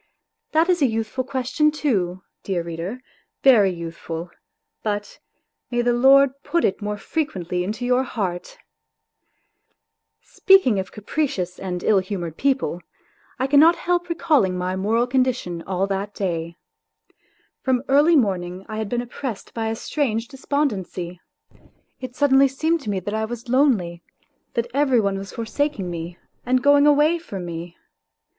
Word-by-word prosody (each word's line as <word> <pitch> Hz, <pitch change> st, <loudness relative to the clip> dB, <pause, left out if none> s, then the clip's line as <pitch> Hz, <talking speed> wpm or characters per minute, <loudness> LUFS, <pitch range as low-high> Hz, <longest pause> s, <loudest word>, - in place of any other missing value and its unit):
That 320 Hz, +2 st, +3 dB
is 355 Hz, -3 st, +2 dB
a 275 Hz, -, +5 dB
youthful 225 Hz, +3 st, -2 dB
question 260 Hz, +3 st, +1 dB
too, 195 Hz, -, -1 dB, 0.2 s
dear 180 Hz, -3 st, -2 dB
reader, 170 Hz, +9 st, -6 dB, 0.4 s
very 230 Hz, -8 st, +6 dB
youthful, 170 Hz, -1 st, -6 dB, 0.5 s
but 205 Hz, -1 st, -4 dB, 0.5 s
may 240 Hz, -1 st, 0 dB
the 240 Hz, 0 st, +2 dB
Lord 270 Hz, +2 st, +6 dB
put 340 Hz, +3 st, 0 dB
it 195 Hz, -, -1 dB
more 210 Hz, 0 st, -3 dB
frequently 185 Hz, -, -2 dB
into 215 Hz, +6 st, -4 dB
your 250 Hz, +1 st, +3 dB
heart!... 205 Hz, -, -4 dB, 1.6 s
Speaking 380 Hz, -, +4 dB
of 190 Hz, -, -5 dB
capricious 205 Hz, -, -3 dB
and 180 Hz, -2 st, -4 dB
ill 205 Hz, -3 st, +4 dB
humoured 180 Hz, -4 st, -5 dB
people, 265 Hz, -9 st, 0 dB, 0.6 s
I 260 Hz, -, 0 dB
cannot 295 Hz, +5 st, +6 dB
help 350 Hz, 0 st, -1 dB
recalling 295 Hz, -, +2 dB
my 180 Hz, +1 st, -2 dB
moral 220 Hz, +5 st, +1 dB
condition 250 Hz, -9 st, 0 dB
all 190 Hz, 0 st, 0 dB
that 200 Hz, +1 st, -3 dB
day. 170 Hz, -3 st, -3 dB, 1.0 s
From 255 Hz, -1 st, +1 dB
early 295 Hz, +5 st, +5 dB
morning 185 Hz, -, 0 dB
I 215 Hz, -1 st, -6 dB
had 215 Hz, -2 st, -3 dB
been 245 Hz, +1 st, -1 dB
oppressed 245 Hz, -2 st, -6 dB
by 225 Hz, -1 st, -2 dB
a 220 Hz, -, -1 dB
strange 230 Hz, -3 st, -2 dB
despondency. 205 Hz, -, -3 dB, 0.8 s
It 255 Hz, -1 st, -7 dB
suddenly 275 Hz, -1 st, +5 dB
seemed 315 Hz, +5 st, 0 dB
to 215 Hz, -, -6 dB
me 195 Hz, -2 st, 0 dB
that 205 Hz, +3 st, -4 dB
I 220 Hz, 0 st, 0 dB
was 235 Hz, +1 st, -7 dB
lonely, 225 Hz, -11 st, +2 dB, 0.5 s
that 235 Hz, -, +1 dB
every 270 Hz, -3 st, +3 dB
one 200 Hz, -2 st, 0 dB
was 195 Hz, 0 st, -8 dB
forsaking 230 Hz, -4 st, -2 dB
me 170 Hz, +1 st, -6 dB, 0.3 s
and 255 Hz, +1 st, +1 dB
going 285 Hz, 0 st, +6 dB
away 300 Hz, +3 st, +4 dB
from 195 Hz, -, -7 dB
me. 170 Hz, 0 st, -7 dB
225 Hz, 145 wpm, -22 LUFS, 185-275 Hz, 1.6 s, very